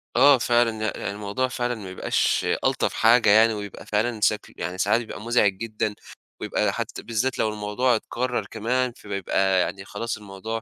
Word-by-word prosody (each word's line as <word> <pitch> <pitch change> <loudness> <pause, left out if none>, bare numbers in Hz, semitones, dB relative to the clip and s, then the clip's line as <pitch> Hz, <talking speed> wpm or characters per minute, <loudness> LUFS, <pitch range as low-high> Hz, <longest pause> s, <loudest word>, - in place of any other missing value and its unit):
آه 140 -2 +7
فعلًا، 120 -2 +1
ي - - 0
يعني 100 - -2
الموضوع 105 +5 -2
فعلًا 120 -1 -2
ما 100 -4 -8
يبقاش 95 - 0 0.2
ألطف - - +1
حاجة 115 -1 +4
يعني 110 +2 +6
ويبقى 105 -2 -7
فعلًا 110 +2 -1
سكل 105 0 0
يعني 90 +2 -4
ساعات 110 +5 +2
يبقى 110 - -8
مُزعِج 115 -4 +2
جدًا 110 -1 -3 0.5
ويبقى - - 0
حتّى - - -5
بالذات 120 +3 -1
لو 110 - +2
الموضوع 105 +4 0
اتكرر 120 -1 -2
كمان، 120 +3 -1
فبيبقى 95 -1 0
يعني 95 +1 -3
خلاص 115 +2 -4
الموضوع 105 +2 -6
110 Hz, 170 wpm, -24 LUFS, 105-120 Hz, 0.5 s, آه